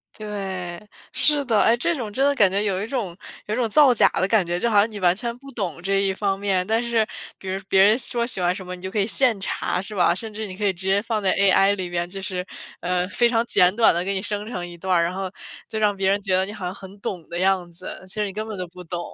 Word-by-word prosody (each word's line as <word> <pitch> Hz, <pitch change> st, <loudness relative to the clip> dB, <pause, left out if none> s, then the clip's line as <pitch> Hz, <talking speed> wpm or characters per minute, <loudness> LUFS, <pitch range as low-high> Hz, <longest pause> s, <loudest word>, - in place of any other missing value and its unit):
对， 190 Hz, -5 st, -5 dB, 0.3 s
是 285 Hz, +2 st, +4 dB
的。 225 Hz, -4 st, +2 dB
哎， 235 Hz, +1 st, +4 dB
这 335 Hz, +7 st, +2 dB
种 225 Hz, -6 st, -5 dB
真 270 Hz, +6 st, +1 dB
的 285 Hz, -, +3 dB
感 205 Hz, -8 st, +4 dB
觉 200 Hz, +2 st, -1 dB
有 195 Hz, -2 st, -1 dB
一 -, -, -3 dB
种 220 Hz, -10 st, -3 dB, 0.3 s
有 210 Hz, -, -3 dB
一 -, -, 0 dB
种 240 Hz, -3 st, 0 dB
造 275 Hz, +1 st, +6 dB
假 -, -, +5 dB
的 185 Hz, -, +1 dB
感 215 Hz, -3 st, +3 dB
觉， 175 Hz, +1 st, -2 dB
就 235 Hz, -, 0 dB
好 210 Hz, -, +2 dB
像 210 Hz, +3 st, +5 dB
你 210 Hz, -2 st, -8 dB
完 180 Hz, -1 st, +3 dB
全 235 Hz, +2 st, -4 dB
不 275 Hz, +1 st, -13 dB
懂 190 Hz, -, -4 dB
这 195 Hz, +1 st, +1 dB
一 195 Hz, -1 st, +1 dB
方 195 Hz, 0 st, -2 dB
面。 190 Hz, -2 st, +1 dB
但 225 Hz, +3 st, +1 dB
是， 230 Hz, -2 st, +1 dB, 0.3 s
比 190 Hz, -, -11 dB
如 190 Hz, +1 st, -3 dB
别 190 Hz, -, +5 dB
人 210 Hz, +2 st, +6 dB
说 240 Hz, -2 st, +1 dB
喜 210 Hz, -6 st, -4 dB
欢 175 Hz, 0 st, +2 dB
什 185 Hz, -, -8 dB
么， 180 Hz, 0 st, -6 dB
你 180 Hz, -, -15 dB
就 190 Hz, -, -4 dB
可 210 Hz, -, -5 dB
以 200 Hz, -, +2 dB
现 235 Hz, -2 st, +5 dB
查， 185 Hz, -1 st, -2 dB
是 210 Hz, +2 st, -3 dB
吧？ 175 Hz, -1 st, +3 dB
甚 220 Hz, +2 st, -3 dB
至 215 Hz, 0 st, -4 dB
你 185 Hz, 0 st, -9 dB
可 210 Hz, -, -2 dB
以 195 Hz, -, +2 dB
直 190 Hz, +2 st, -7 dB
接 195 Hz, +1 st, +3 dB
放 220 Hz, -1 st, -2 dB
在 190 Hz, -, +2 dB
AI 195 Hz, 0 st, +4 dB
里 185 Hz, -2 st, -4 dB
面， 175 Hz, 0 st, -2 dB
就 195 Hz, +1 st, -6 dB
是， 185 Hz, -1 st, -4 dB, 0.4 s
呃， 180 Hz, 0 st, -1 dB
非 240 Hz, +2 st, +2 dB
常 230 Hz, 0 st, +1 dB
简 185 Hz, -3 st, +4 dB
短 230 Hz, -6 st, +5 dB
地 175 Hz, +1 st, 0 dB
给 195 Hz, +1 st, -1 dB
你 190 Hz, -, -1 dB
生 205 Hz, +1 st, -1 dB
成 180 Hz, -7 st, -5 dB
一 175 Hz, -, -10 dB
段 190 Hz, +2 st, -4 dB
儿， 170 Hz, -, +3 dB
然 170 Hz, +2 st, -2 dB
后， 190 Hz, 0 st, -4 dB, 0.4 s
就 220 Hz, -, -4 dB
让 210 Hz, -2 st, +1 dB
别 195 Hz, 0 st, 0 dB
人 200 Hz, +1 st, +2 dB
觉 190 Hz, -2 st, +1 dB
得 190 Hz, +1 st, +2 dB
你 205 Hz, -, -6 dB
好 200 Hz, -4 st, -7 dB
像 180 Hz, -, -4 dB
很 195 Hz, +1 st, -12 dB
懂 180 Hz, -5 st, -6 dB
的 170 Hz, -, -5 dB
样 185 Hz, -2 st, +1 dB
子， 170 Hz, +2 st, -8 dB
其 185 Hz, -, -2 dB
实 210 Hz, -1 st, -1 dB
你 195 Hz, -, -6 dB
根 215 Hz, +1 st, -5 dB
本 215 Hz, -3 st, -6 dB
都 180 Hz, -1 st, -5 dB
不 180 Hz, 0 st, -12 dB
懂。 175 Hz, +1 st, -5 dB
195 Hz, 325 characters per minute, -22 LUFS, 185-220 Hz, 0.4 s, 造